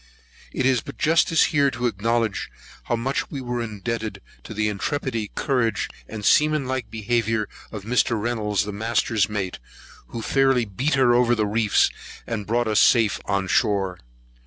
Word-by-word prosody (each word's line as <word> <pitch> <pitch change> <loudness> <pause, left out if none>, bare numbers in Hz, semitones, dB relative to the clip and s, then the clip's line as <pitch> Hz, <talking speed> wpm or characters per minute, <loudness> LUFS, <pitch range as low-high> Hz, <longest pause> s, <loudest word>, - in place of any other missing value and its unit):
It 130 - -1
is 130 -3 +3
but 140 - -10
justice 165 +1 +3
here 140 -2 +4
to 125 -1 -4
acknowledge 115 0 0 0.4
how 120 - 0
much 130 +4 -2
we 140 - -5
were 120 -2 -3
indebted 110 -1 -4 0.3
to - - -9
the 105 0 +1
intrepidity, 115 0 -2
courage, 120 -7 0 0.2
and 110 -2 -6
seaman 150 +2 +4
like 130 -2 -3
behaviour 110 -1 0 0.2
of 105 -3 -7
Mr. 115 0 +1
Reynolds 105 -2 0
the 105 - -4
master's 110 0 0
mate, 95 -4 -3 0.5
who 115 - -6
fairly 135 -2 +2
beat 125 +9 -1
her 130 -3 +4
over 120 0 +4
all - - 0
the 110 - +1
reefs, 105 0 +2 0.3
and 105 -4 -4
brought 120 +1 +1
us 110 -1 +3
safe 115 -4 +4
on 100 -1 -1
shore. 95 -1 +1
115 Hz, 165 wpm, -23 LUFS, 105-125 Hz, 0.5 s, here